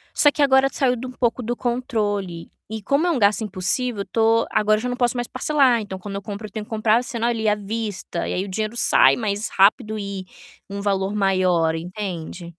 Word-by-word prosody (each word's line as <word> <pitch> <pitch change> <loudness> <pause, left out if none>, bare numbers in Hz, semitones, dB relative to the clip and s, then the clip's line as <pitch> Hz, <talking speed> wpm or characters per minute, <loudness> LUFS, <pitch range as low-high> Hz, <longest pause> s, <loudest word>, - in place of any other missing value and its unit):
Só 290 - +5
que 295 - -3
agora 265 -1 +5
saiu 255 -2 +1
de 250 +2 -7
um 255 - -6
pouco 245 -1 -1
do 240 +2 -2
controle, 210 -8 -2 0.2
e 220 0 -6
como 280 - +1
é 350 - +2
um 270 - 0
gasto 205 +2 +3
impulsivo, 205 +4 0
eu 200 - -3
tô 225 0 +2
agora 215 0 +2
já 250 +2 -3
não 245 - -2
posso 245 -1 +1
mais 240 0 -2
parcelar, 255 -3 +2
então 190 -2 -7
quando 195 +1 -7
eu 200 - -4
compro 215 0 -6
eu 210 - -17
tenho 215 -1 -5
que - - -26
comprar, 220 +2 +2
sendo 235 -2 -3
ali 225 -2 -1
à 210 - +4
vista 210 -4 -4
e - - -2
aí 185 - -1
o - - -7
dinheiro 215 +3 -3
sai 240 - +5
mais 210 -2 -2
rápido 215 +2 +2
e 200 -2 -5 0.4
um 200 0 -6
valor 195 0 0
maior, 185 -5 +2
entende. 180 0 -6
215 Hz, 225 wpm, -22 LUFS, 200-240 Hz, 0.4 s, Só